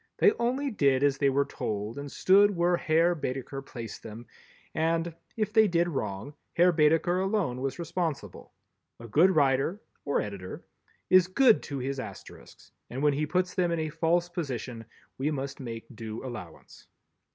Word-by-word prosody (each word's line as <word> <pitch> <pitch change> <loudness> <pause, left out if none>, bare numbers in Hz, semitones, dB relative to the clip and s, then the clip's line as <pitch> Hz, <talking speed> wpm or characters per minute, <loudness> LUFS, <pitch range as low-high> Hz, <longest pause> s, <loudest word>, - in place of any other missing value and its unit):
They 420 - +6
only 260 +4 0
did 140 - +2
as 140 -1 +2
they 140 - +4
were 140 +1 +2
told 105 +2 -4
and 140 -1 -7
stood 200 +2 +5
where 175 +1 +3
Herr 165 +1 +2
Baedeker 135 -3 -4
placed 115 -5 -8
them 110 +2 -9 0.5
and, 165 +1 0 0.2
if 215 -1 -1
they 220 -2 +6
did 175 -2 +2
wrong, 110 - -4 0.2
Herr 180 +1 +5
Baedeker 165 +3 +3
alone 190 - -1
was 135 -1 -2
responsible. 170 -2 -4 0.5
A 115 - -9
good 160 - +5
writer—or 140 +2 0
editor—is 105 - -1
good 230 +4 +4
to 140 - -5
his 135 +1 -3
Asterisks, 120 - -11 0.2
and 130 +4 -4
when 150 -1 +4
he 150 +2 -1
puts 180 +3 0
them 180 -2 +1
in 170 - 0
a 155 - -2
false 165 +2 +1
position 130 - -5 0.3
we 140 +3 +1
must 140 -2 -4
make 115 -3 -6
due 110 +2 -6
allowance. 115 -10 -10
150 Hz, 160 wpm, -28 LUFS, 130-175 Hz, 0.5 s, They